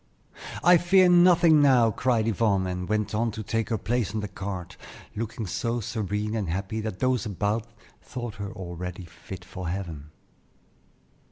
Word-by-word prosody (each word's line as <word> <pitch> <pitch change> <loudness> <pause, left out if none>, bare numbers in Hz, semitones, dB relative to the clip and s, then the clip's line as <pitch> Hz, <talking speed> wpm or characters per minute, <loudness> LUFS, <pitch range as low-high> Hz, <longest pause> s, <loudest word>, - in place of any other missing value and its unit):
"I 180 0 +7
fear 185 +2 +5
nothing 175 -3 +6
now!" 125 -5 +5
cried 115 0 +1
Yvonne, 100 -3 +1
and 90 0 -4
went 105 -1 0
on 115 +2 +1
to 110 -1 -5
take 115 +2 -2
her 115 - 0
place 110 +1 -1
in 110 - -1
the 105 - -3
cart, 95 -2 -6 0.4
looking 110 0 -4
so 110 +6 -2
serene 105 -1 -3
and 105 -6 -2
happy 100 +5 -3
that 110 -3 -4
those 130 -1 0
about 105 +3 -1
her - - -28 0.3
thought 120 -4 -6
her 100 -1 -5
already 90 -2 -6
fit 85 +2 -10
for 90 -1 -6
heaven. 85 -5 -5
105 Hz, 165 wpm, -26 LUFS, 95-115 Hz, 0.4 s, I